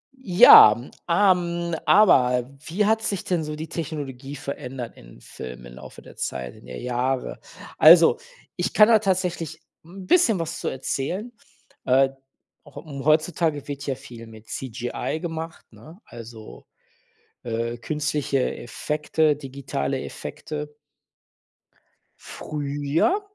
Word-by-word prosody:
Ja, 180 Hz, -, +8 dB
m 120 Hz, +3 st, -11 dB, 0.2 s
ähm, 175 Hz, -2 st, +2 dB
aber 125 Hz, -, +4 dB, 0.2 s
wie 200 Hz, +6 st, 0 dB
hat 220 Hz, +1 st, +2 dB
sich 200 Hz, -4 st, -3 dB
denn 175 Hz, -4 st, -1 dB
so 150 Hz, 0 st, -5 dB
die 160 Hz, +1 st, -6 dB
Technologie 145 Hz, -4 st, -6 dB
verändert 125 Hz, -3 st, -7 dB
in -, -, -16 dB
Filmen 60 Hz, -1 st, -10 dB
im -, -, -12 dB
Laufe -, -, -12 dB
der -, -, -15 dB
Zeit, 65 Hz, -2 st, -5 dB
in -, -, -17 dB
der 65 Hz, 0 st, -8 dB
Jahre. 125 Hz, +1 st, -2 dB, 0.4 s
Also, 165 Hz, -, +7 dB, 0.4 s
ich -, -, -2 dB
kann 210 Hz, 0 st, +7 dB
da 220 Hz, -2 st, +6 dB
tatsächlich 180 Hz, -5 st, -2 dB, 0.2 s
'n 185 Hz, +3 st, -11 dB
bisschen 230 Hz, -, +3 dB
was 165 Hz, 0 st, -4 dB
zu -, -, -4 dB
erzählen. 175 Hz, -, -3 dB, 0.5 s
Äh, 135 Hz, +1 st, +4 dB, 0.5 s
auch 145 Hz, -, -17 dB
äh, 155 Hz, -, -10 dB
hm, 140 Hz, 0 st, -7 dB
heutzutage 155 Hz, -1 st, +1 dB
wird 140 Hz, -1 st, -6 dB
ja 135 Hz, -2 st, -2 dB
viel 115 Hz, -2 st, -12 dB
mit 110 Hz, -1 st, -15 dB
CGI 125 Hz, +4 st, -4 dB
gemacht, 165 Hz, -1 st, -6 dB
ne? 165 Hz, +6 st, -15 dB
Also, 115 Hz, -2 st, -12 dB, 0.8 s
äh, 115 Hz, 0 st, -3 dB
künstliche 145 Hz, 0 st, -2 dB
Effekte, 150 Hz, +4 st, -1 dB
digitale 135 Hz, -, -4 dB
Effekte 150 Hz, -1 st, -7 dB, 1.4 s
früher, 145 Hz, -, -2 dB
150 Hz, 130 wpm, -23 LUFS, 125-170 Hz, 1.4 s, Ja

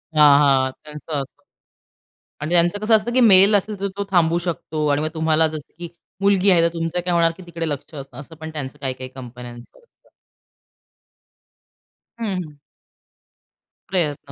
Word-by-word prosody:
हां, 150 Hz, -2 st, +7 dB
हां, 135 Hz, -2 st, +3 dB
त्याचं 150 Hz, 0 st, -6 dB
असतं.आणि 135 Hz, -, -15 dB, 0.9 s
त्यांचं 175 Hz, +3 st, +3 dB
कसं 220 Hz, +1 st, +4 dB
असतं, 225 Hz, +3 st, -3 dB
की 255 Hz, -, +3 dB
मेल 200 Hz, -2 st, +7 dB
असेल 205 Hz, +1 st, 0 dB
तर 200 Hz, -, -1 dB
तो 200 Hz, -, -2 dB
थांबू 170 Hz, -2 st, +2 dB
शकतो 155 Hz, -2 st, -3 dB
आणि 145 Hz, -, 0 dB
मग 155 Hz, -, -1 dB
तुम्हाला 160 Hz, 0 st, +2 dB
असं 155 Hz, 0 st, -1 dB
असतं, 150 Hz, -, -11 dB
की 175 Hz, -1 st, -6 dB, 0.3 s
मुलगी 200 Hz, 0 st, +3 dB
आहे, 170 Hz, -3 st, +4 dB
तर 170 Hz, -, +4 dB
तुमचं 165 Hz, +1 st, -2 dB
काय 175 Hz, 0 st, -2 dB
होणार 165 Hz, -1 st, +3 dB
की 185 Hz, -, -12 dB
तिकडे 165 Hz, -1 st, -4 dB
लक्ष 145 Hz, +2 st, -6 dB
असतं, 135 Hz, -3 st, -10 dB
असं 160 Hz, +3 st, -12 dB
पण 160 Hz, 0 st, -8 dB
त्यांचं 145 Hz, -4 st, -7 dB
काही-काही 130 Hz, -1 st, -4 dB
कंपन्यांचं 120 Hz, -2 st, -10 dB, 0.2 s
असतं. 480 Hz, -, -30 dB, 2.1 s
हं, 210 Hz, -4 st, -2 dB
हं. 150 Hz, -2 st, -14 dB, 1.3 s
प्रयत्न 150 Hz, -6 st, -2 dB
160 Hz, 165 wpm, -21 LUFS, 145-185 Hz, 2.1 s, हां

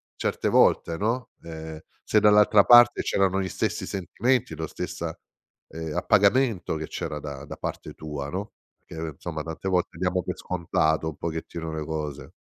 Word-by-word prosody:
certe -, -, -1 dB
volte, 85 Hz, -1 st, +3 dB
no, 115 Hz, +4 st, -1 dB
uhm, 80 Hz, -1 st, -8 dB, 0.2 s
se 105 Hz, -, +3 dB
dall'altra 105 Hz, 0 st, +6 dB
parte 120 Hz, 0 st, +7 dB
c'erano 95 Hz, -1 st, +1 dB
gli 95 Hz, -, -2 dB
stessi -, -, -2 dB
sentimenti, 115 Hz, +7 st, -1 dB
lo -, -, -4 dB
stessa, -, -, -5 dB, 0.5 s
ehm, 80 Hz, -2 st, -6 dB
appagamento 105 Hz, -2 st, +2 dB
che 80 Hz, 0 st, -4 dB
c'era 75 Hz, -1 st, -4 dB
da 70 Hz, -1 st, -7 dB
da -, -, -8 dB
parte -, -, -6 dB
tua, 75 Hz, -2 st, -6 dB
no, 100 Hz, +6 st, -5 dB, 0.3 s
perché, 80 Hz, -2 st, -6 dB
insomma, 80 Hz, -3 st, -5 dB
tante 80 Hz, +4 st, -5 dB
volte 90 Hz, -2 st, 0 dB
diamo 90 Hz, 0 st, 0 dB
per -, -, -4 dB
scontato 80 Hz, -3 st, 0 dB
un 80 Hz, -, -8 dB
pochettino 80 Hz, 0 st, -5 dB
le 80 Hz, -1 st, -4 dB
cose. 75 Hz, -3 st, -5 dB
85 Hz, 160 wpm, -26 LUFS, 80-100 Hz, 0.5 s, parte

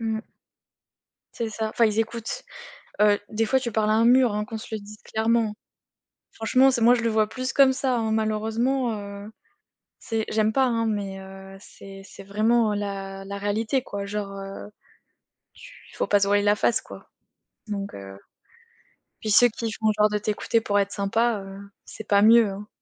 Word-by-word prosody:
Mmh. 220 Hz, -1 st, -2 dB, 1.2 s
C'est 230 Hz, -1 st, -3 dB
ça, 220 Hz, 0 st, -3 dB
enfin, 230 Hz, +1 st, +2 dB
ils 215 Hz, 0 st, 0 dB
écoutent, 225 Hz, +1 st, -3 dB, 0.6 s
heu, 210 Hz, -1 st, +5 dB
des 220 Hz, +1 st, 0 dB
fois 265 Hz, +3 st, +3 dB
tu 240 Hz, -4 st, -4 dB
parles 215 Hz, -1 st, +1 dB
à 215 Hz, -, +3 dB
un 225 Hz, +1 st, +3 dB
mur 245 Hz, -2 st, +5 dB
hein, 210 Hz, -, -1 dB
qu'on 220 Hz, +1 st, -6 dB
se 215 Hz, -, -9 dB
le -, -, -2 dB
dise 210 Hz, +1 st, -12 dB
clairement. 220 Hz, -1 st, 0 dB, 0.8 s
Franchement, 255 Hz, +4 st, +3 dB
c'est 245 Hz, -, -1 dB
moi 235 Hz, +2 st, +6 dB
je 240 Hz, -, -1 dB
le 230 Hz, -, +1 dB
vois 215 Hz, -1 st, +2 dB
plus 255 Hz, +3 st, -4 dB
comme 270 Hz, -1 st, +5 dB
ça 260 Hz, -1 st, -1 dB
hein. 225 Hz, -2 st, -1 dB
Malheureusement, 225 Hz, +4 st, 0 dB
heu, 200 Hz, +1 st, -8 dB, 0.7 s
c'est 225 Hz, -2 st, -2 dB
j'aime 215 Hz, 0 st, +1 dB
pas 265 Hz, -, +3 dB
hein, 230 Hz, -2 st, 0 dB
mais 200 Hz, -2 st, -3 dB
heu, 195 Hz, 0 st, -11 dB
c'est 195 Hz, -1 st, -13 dB
c'est 195 Hz, -, -12 dB
vraiment 215 Hz, +2 st, +2 dB
la 195 Hz, -1 st, -5 dB
la 200 Hz, +1 st, -6 dB
réalité 215 Hz, +6 st, -1 dB
quoi, 200 Hz, -1 st, -5 dB
genre, 205 Hz, 0 st, -4 dB
heu, 195 Hz, +1 st, -8 dB, 0.9 s
tu -, -, -14 dB, 0.2 s
faut -, -, -1 dB
pas 205 Hz, -, +3 dB
se 200 Hz, -, +2 dB
voiler 205 Hz, 0 st, +3 dB
la 205 Hz, 0 st, +4 dB
face, 220 Hz, +2 st, +1 dB
quoi, -, -, -13 dB, 0.6 s
donc 200 Hz, -1 st, -4 dB
heu, 95 Hz, 0 st, -10 dB, 1.0 s
puis 215 Hz, -, -3 dB
ceux 245 Hz, +4 st, +6 dB
qui 225 Hz, 0 st, -5 dB
font 220 Hz, 0 st, 0 dB
genre 210 Hz, 0 st, +4 dB
de 210 Hz, -, 0 dB
t'écouter 215 Hz, +2 st, 0 dB
pour 205 Hz, -2 st, 0 dB
être 200 Hz, 0 st, 0 dB
sympa, 220 Hz, +2 st, 0 dB
heu, 195 Hz, -, -9 dB, 0.3 s
c'est 220 Hz, -, -9 dB
pas 200 Hz, -1 st, +4 dB
mieux, 225 Hz, +1 st, +6 dB
hein. 200 Hz, +2 st, -8 dB
215 Hz, 190 wpm, -24 LUFS, 200-230 Hz, 1.2 s, moi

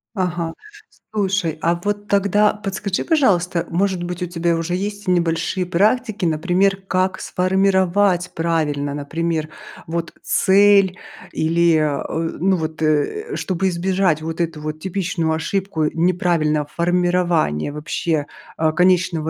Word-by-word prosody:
Ага, 175 Hz, -3 st, -2 dB, 0.6 s
слушай, 195 Hz, -6 st, 0 dB
а 170 Hz, +1 st, +2 dB
вот 205 Hz, 0 st, -2 dB
тогда 200 Hz, +1 st, +3 dB
подскажи, 200 Hz, -2 st, -3 dB
пожалуйста, 180 Hz, -, +2 dB
может 185 Hz, 0 st, 0 dB
быть, 175 Hz, +1 st, -5 dB
у -, -, 0 dB
тебя 170 Hz, -1 st, 0 dB
уже 165 Hz, +2 st, -2 dB
есть 205 Hz, +2 st, -4 dB
небольшие 175 Hz, +1 st, 0 dB
практики, 210 Hz, +3 st, +1 dB
например, 180 Hz, +5 st, +1 dB
как 185 Hz, 0 st, 0 dB
сформировать 190 Hz, 0 st, +1 dB
правильно. 150 Hz, -4 st, -1 dB
Например, 155 Hz, +2 st, -2 dB, 0.4 s
вот, 170 Hz, +1 st, -3 dB
цель 195 Hz, -1 st, +4 dB, 0.3 s
или, 165 Hz, +1 st, +2 dB
э, 155 Hz, +2 st, -2 dB
ну 190 Hz, +2 st, +2 dB
вот, 160 Hz, -1 st, -5 dB
э, 160 Hz, -, 0 dB
чтобы 190 Hz, 0 st, -1 dB
избежать 185 Hz, -2 st, +1 dB
вот 165 Hz, +2 st, -4 dB
эту 165 Hz, -2 st, -2 dB
вот 155 Hz, 0 st, -5 dB
типичную 180 Hz, -3 st, -1 dB
ошибку 160 Hz, +1 st, -1 dB
неправильного 165 Hz, -3 st, +1 dB
формирования 175 Hz, -, +1 dB
вообще, 150 Hz, 0 st, -2 dB, 0.3 s
э, 160 Hz, -1 st, +2 dB
конечного 180 Hz, -2 st, +2 dB
175 Hz, 120 wpm, -20 LUFS, 160-190 Hz, 0.6 s, цель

